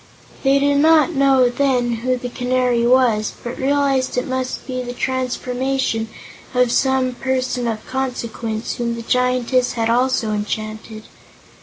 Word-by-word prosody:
They 270 Hz, 0 st, +3 dB
did 285 Hz, 0 st, +2 dB
not 320 Hz, +2 st, +5 dB
know, 270 Hz, -2 st, +4 dB
then, 245 Hz, -2 st, +1 dB
who 255 Hz, +2 st, -1 dB
the 245 Hz, 0 st, -5 dB
Canary 250 Hz, -1 st, +1 dB
was, 240 Hz, -4 st, +3 dB
but 240 Hz, +1 st, -6 dB
realized 275 Hz, -2 st, +1 dB
it 250 Hz, -, 0 dB
must 260 Hz, 0 st, -3 dB
be 255 Hz, -1 st, -3 dB
the 245 Hz, 0 st, -5 dB
transformation 255 Hz, -2 st, -1 dB, 0.5 s
of 250 Hz, -1 st, +3 dB
some 265 Hz, -1 st, +2 dB
person 255 Hz, -1 st, -2 dB
of 220 Hz, -2 st, -4 dB
consequence, 235 Hz, -4 st, -4 dB
whom 235 Hz, -1 st, -2 dB
the 230 Hz, -, -7 dB
Giantess 250 Hz, +1 st, +1 dB
had 230 Hz, -1 st, 0 dB
also 245 Hz, -2 st, +1 dB
enchanted. 215 Hz, +1 st, -4 dB
250 Hz, 140 wpm, -20 LUFS, 235-265 Hz, 0.5 s, not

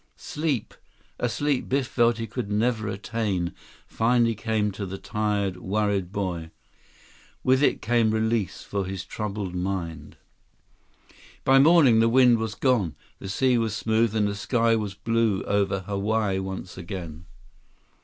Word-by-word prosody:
Sleep, 150 Hz, -7 st, -3 dB, 0.5 s
a 120 Hz, -, 0 dB
sleep 145 Hz, +2 st, -1 dB
Biff 135 Hz, 0 st, +1 dB
felt 120 Hz, -1 st, +2 dB
he 115 Hz, -, -3 dB
could 115 Hz, -1 st, -5 dB
never 110 Hz, +1 st, 0 dB
attain, 100 Hz, -3 st, -2 dB, 0.3 s
finally 115 Hz, 0 st, +2 dB
came 110 Hz, -1 st, -1 dB
to 100 Hz, 0 st, -5 dB
the 95 Hz, +1 st, -6 dB
tired, 100 Hz, -3 st, -1 dB
worried 100 Hz, -1 st, -1 dB
boy. 90 Hz, -5 st, -3 dB, 0.9 s
With 130 Hz, +1 st, +3 dB
it 145 Hz, -, +2 dB
came 115 Hz, -1 st, +3 dB
release 110 Hz, -2 st, -1 dB
for 100 Hz, -1 st, -3 dB
his 95 Hz, 0 st, -5 dB
troubled 105 Hz, -3 st, -4 dB
mind. 90 Hz, -4 st, -4 dB, 1.3 s
By 135 Hz, 0 st, +5 dB
morning, 140 Hz, -6 st, +6 dB
the 115 Hz, 0 st, +4 dB
wind 125 Hz, -1 st, +5 dB
was 110 Hz, -2 st, -3 dB
gone. 110 Hz, -, +1 dB, 0.2 s
The 95 Hz, -, -7 dB
sea 125 Hz, +4 st, +2 dB
was 110 Hz, -2 st, -1 dB
smooth, 110 Hz, +1 st, +1 dB
and 105 Hz, -2 st, +2 dB
the 100 Hz, -, -2 dB
sky 115 Hz, +2 st, +1 dB
was 105 Hz, -3 st, -3 dB
blue 110 Hz, -1 st, 0 dB
over 100 Hz, -1 st, 0 dB
Hawaii 100 Hz, +1 st, -1 dB
once 95 Hz, -1 st, -6 dB
again. 85 Hz, -2 st, -7 dB
105 Hz, 145 wpm, -25 LUFS, 95-115 Hz, 1.3 s, morning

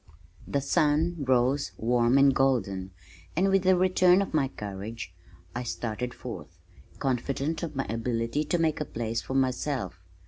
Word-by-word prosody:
The 140 Hz, -, 0 dB
sun 155 Hz, +4 st, +2 dB
rose 130 Hz, +1 st, +1 dB
warm 120 Hz, +2 st, +3 dB
and 140 Hz, 0 st, +6 dB
golden, 115 Hz, -9 st, +1 dB, 0.5 s
and 190 Hz, +4 st, +3 dB
with 195 Hz, -1 st, +2 dB
a 185 Hz, -, +6 dB
return 185 Hz, 0 st, +4 dB
of 195 Hz, -, -8 dB
my 145 Hz, -4 st, +2 dB
courage 100 Hz, -4 st, -7 dB, 0.4 s
I 120 Hz, -, -3 dB
started 120 Hz, 0 st, -3 dB
forth, 85 Hz, -11 st, -9 dB, 0.4 s
confident 135 Hz, +4 st, -1 dB
of 160 Hz, -4 st, -5 dB
my 135 Hz, -, -1 dB
ability 115 Hz, +4 st, -1 dB
to 175 Hz, -, +1 dB
make 160 Hz, -2 st, +1 dB
a -, -, -1 dB
place 115 Hz, -2 st, -3 dB
for 130 Hz, -, -5 dB
myself. 130 Hz, -, -1 dB
130 Hz, 150 wpm, -28 LUFS, 115-150 Hz, 0.5 s, and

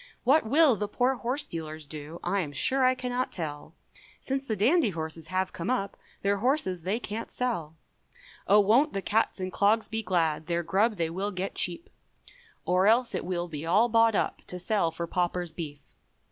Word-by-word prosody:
What 270 Hz, 0 st, +4 dB
will 290 Hz, -2 st, +5 dB
the 210 Hz, 0 st, -3 dB
poor 250 Hz, +5 st, +1 dB
horse 260 Hz, +3 st, -1 dB
dealers 155 Hz, -2 st, -7 dB
do, 150 Hz, +3 st, -8 dB
I 195 Hz, +3 st, 0 dB
am 150 Hz, -6 st, -3 dB
sure 260 Hz, -, +1 dB
I 255 Hz, 0 st, +4 dB
cannot 255 Hz, 0 st, -2 dB
tell, 155 Hz, -1 st, -6 dB, 0.4 s
Since 270 Hz, +1 st, -3 dB
the 220 Hz, -, 0 dB
dandy 250 Hz, -, +3 dB
horses 160 Hz, -2 st, -6 dB
have 185 Hz, 0 st, -1 dB
come 170 Hz, +6 st, -4 dB
up 250 Hz, -6 st, -1 dB, 0.3 s
Their 200 Hz, 0 st, +2 dB
horses 205 Hz, -, +1 dB
they 195 Hz, +7 st, -1 dB
can't 225 Hz, -1 st, -5 dB
sell; 175 Hz, -12 st, -3 dB, 0.7 s
Oh, 210 Hz, +1 st, +6 dB
won't 240 Hz, +10 st, +3 dB
the 195 Hz, -, -3 dB
cats 220 Hz, -1 st, +1 dB
and 185 Hz, 0 st, -3 dB
clogs 215 Hz, +2 st, +2 dB
be 220 Hz, 0 st, -2 dB
glad, 165 Hz, -5 st, 0 dB
Their 170 Hz, 0 st, 0 dB
grub 210 Hz, +6 st, +2 dB
they 165 Hz, -3 st, -1 dB
will 195 Hz, +4 st, -2 dB
get 190 Hz, -1 st, -4 dB
cheap, 180 Hz, -, -2 dB, 0.8 s
Or 185 Hz, +2 st, +3 dB
else 235 Hz, +2 st, +3 dB
it -, -, -3 dB
will 175 Hz, -1 st, -2 dB
be 150 Hz, -3 st, -6 dB
all 200 Hz, +9 st, +3 dB
bought 225 Hz, -1 st, +4 dB
up -, -, -1 dB
To 180 Hz, -, -5 dB
sell 180 Hz, -1 st, +1 dB
for 165 Hz, +1 st, -4 dB
Paupers' 175 Hz, 0 st, -1 dB
beef. 155 Hz, -3 st, -7 dB
195 Hz, 190 wpm, -28 LUFS, 170-235 Hz, 0.8 s, Oh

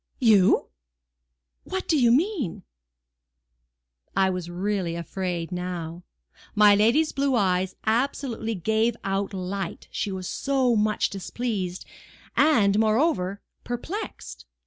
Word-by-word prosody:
"You! 210 Hz, -6 st, +4 dB, 0.9 s
What 375 Hz, 0 st, -4 dB
do 320 Hz, -, +3 dB
you 245 Hz, -5 st, +4 dB
mean?" 270 Hz, -, 0 dB, 1.5 s
I 190 Hz, -1 st, +4 dB
was 180 Hz, -2 st, -4 dB
really 185 Hz, -1 st, -2 dB
afraid 170 Hz, 0 st, -4 dB
now. 180 Hz, -2 st, -4 dB, 0.5 s
My 210 Hz, -1 st, +7 dB
lady's 235 Hz, +10 st, +3 dB
blue 275 Hz, -1 st, +1 dB
eyes 185 Hz, -3 st, +1 dB
absolutely 230 Hz, -1 st, -1 dB
gave 220 Hz, +5 st, +1 dB
out 195 Hz, +1 st, -1 dB
light, 195 Hz, 0 st, -5 dB
she 205 Hz, -, -2 dB
was 185 Hz, -1 st, -5 dB
so 265 Hz, -3 st, +1 dB
much 210 Hz, 0 st, +1 dB
displeased, 195 Hz, -2 st, -4 dB, 0.5 s
and, 215 Hz, -10 st, +4 dB
moreover, 215 Hz, -, +1 dB, 0.2 s
perplexed. 320 Hz, -, -6 dB
205 Hz, 105 wpm, -25 LUFS, 185-245 Hz, 1.5 s, My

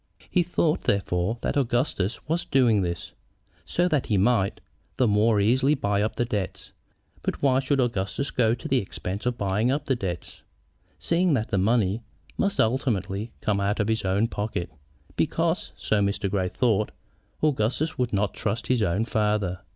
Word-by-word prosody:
He 180 Hz, -, +4 dB
thought, 170 Hz, -2 st, 0 dB
therefore, 100 Hz, +2 st, 0 dB
that -, -, -1 dB
Augustus 120 Hz, -6 st, 0 dB
was 165 Hz, +2 st, 0 dB
doing 120 Hz, -7 st, +3 dB
this, 85 Hz, -2 st, -3 dB, 0.6 s
so 175 Hz, +1 st, +1 dB
that 150 Hz, -6 st, 0 dB
he 105 Hz, -, +2 dB
might 100 Hz, -1 st, +2 dB, 0.4 s
the 125 Hz, -, +3 dB
more 105 Hz, +1 st, +3 dB
easily 130 Hz, +8 st, +3 dB
buy 100 Hz, -6 st, 0 dB
up 110 Hz, +1 st, -1 dB
the 120 Hz, -, 0 dB
debts. 105 Hz, -5 st, -4 dB, 0.5 s
But -, -, -3 dB
why 130 Hz, -2 st, +4 dB
should 135 Hz, +1 st, 0 dB
Augustus 115 Hz, +1 st, -1 dB
go 115 Hz, -2 st, +2 dB
to 120 Hz, -, -7 dB
the 130 Hz, -, +3 dB
expense 100 Hz, +2 st, -5 dB
of 120 Hz, -1 st, -1 dB
buying 105 Hz, +3 st, +1 dB
up 145 Hz, +2 st, 0 dB
the 135 Hz, -, +1 dB
debts, 90 Hz, -6 st, -5 dB, 0.6 s
seeing 170 Hz, -2 st, +2 dB
that 110 Hz, -3 st, -1 dB
the 100 Hz, -, +2 dB
money 105 Hz, 0 st, +2 dB, 0.3 s
must 200 Hz, 0 st, 0 dB
ultimately 110 Hz, -3 st, 0 dB
come 105 Hz, -2 st, +1 dB
out 100 Hz, +2 st, 0 dB
of 105 Hz, 0 st, +1 dB
his 110 Hz, -1 st, 0 dB
own 95 Hz, +4 st, +2 dB
pocket? 105 Hz, -5 st, -3 dB, 0.4 s
Because, -, -, 0 dB
so 105 Hz, -1 st, +1 dB
Mr. 100 Hz, 0 st, 0 dB
Grey 95 Hz, -2 st, 0 dB
thought, 110 Hz, -3 st, +1 dB, 0.5 s
Augustus 145 Hz, +2 st, 0 dB
would 125 Hz, -1 st, 0 dB
not 100 Hz, 0 st, 0 dB
trust 110 Hz, 0 st, -2 dB
his 125 Hz, -3 st, +1 dB
own 100 Hz, +2 st, +1 dB
father. 105 Hz, -5 st, 0 dB
110 Hz, 170 wpm, -26 LUFS, 100-130 Hz, 0.6 s, He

